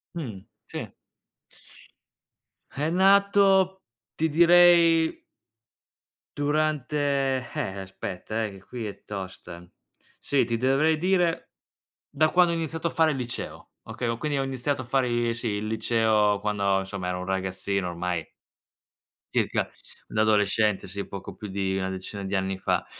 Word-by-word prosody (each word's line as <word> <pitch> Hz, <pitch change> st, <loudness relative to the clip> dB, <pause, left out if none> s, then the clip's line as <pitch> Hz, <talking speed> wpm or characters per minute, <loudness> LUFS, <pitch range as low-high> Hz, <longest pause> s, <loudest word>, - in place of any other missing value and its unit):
Mh, 115 Hz, -, -6 dB, 0.2 s
sì. -, -, -7 dB, 1.8 s
È 150 Hz, +3 st, -1 dB
nato 195 Hz, 0 st, +4 dB, 0.3 s
ti 160 Hz, +1 st, 0 dB
direi 170 Hz, 0 st, +5 dB, 1.1 s
durante 145 Hz, -3 st, 0 dB
eh 95 Hz, +1 st, -3 dB
aspetta, 95 Hz, +3 st, -5 dB
eh, -, -, -4 dB
che 95 Hz, -1 st, -13 dB
qui 120 Hz, 0 st, -6 dB
è 100 Hz, -, -9 dB
tosta. 95 Hz, -3 st, -7 dB, 0.5 s
Sì, 140 Hz, -, +1 dB
ti 115 Hz, 0 st, -1 dB
dovrei 135 Hz, +6 st, +2 dB
dire 175 Hz, 0 st, +1 dB, 0.6 s
da 155 Hz, +2 st, +2 dB
quando 175 Hz, +1 st, +4 dB
ho -, -, -1 dB
iniziato 165 Hz, 0 st, -2 dB
a -, -, 0 dB
fare 160 Hz, -1 st, +3 dB
il 135 Hz, -, -3 dB
liceo. 120 Hz, -1 st, -6 dB
Okay, 120 Hz, -, -4 dB
ho 115 Hz, 0 st, -1 dB
quindi 150 Hz, 0 st, -2 dB
ho -, -, +1 dB
iniziato 135 Hz, +1 st, -2 dB
a -, -, -8 dB
fare 125 Hz, 0 st, +1 dB
i 120 Hz, -1 st, +1 dB
sì 120 Hz, 0 st, -3 dB
il 105 Hz, +1 st, -2 dB
liceo 110 Hz, -2 st, +2 dB
quando 100 Hz, -2 st, +1 dB
insomma 95 Hz, -1 st, -4 dB
ero 90 Hz, -, -2 dB
un 90 Hz, -, -5 dB
ragazzino 95 Hz, 0 st, -2 dB
ormai. 85 Hz, -1 st, -3 dB, 1.1 s
Circa -, -, +1 dB, 0.4 s
da 110 Hz, -, -1 dB
adolescente, 105 Hz, -1 st, +2 dB
sì 100 Hz, +2 st, -4 dB
poco 100 Hz, -1 st, -7 dB
più 105 Hz, -, -8 dB
di 95 Hz, -1 st, -2 dB
una 95 Hz, 0 st, -1 dB
decina 95 Hz, +2 st, -6 dB
di 95 Hz, +1 st, -2 dB
anni 95 Hz, 0 st, -1 dB
fa. -, -, 0 dB
120 Hz, 145 wpm, -26 LUFS, 100-155 Hz, 1.8 s, direi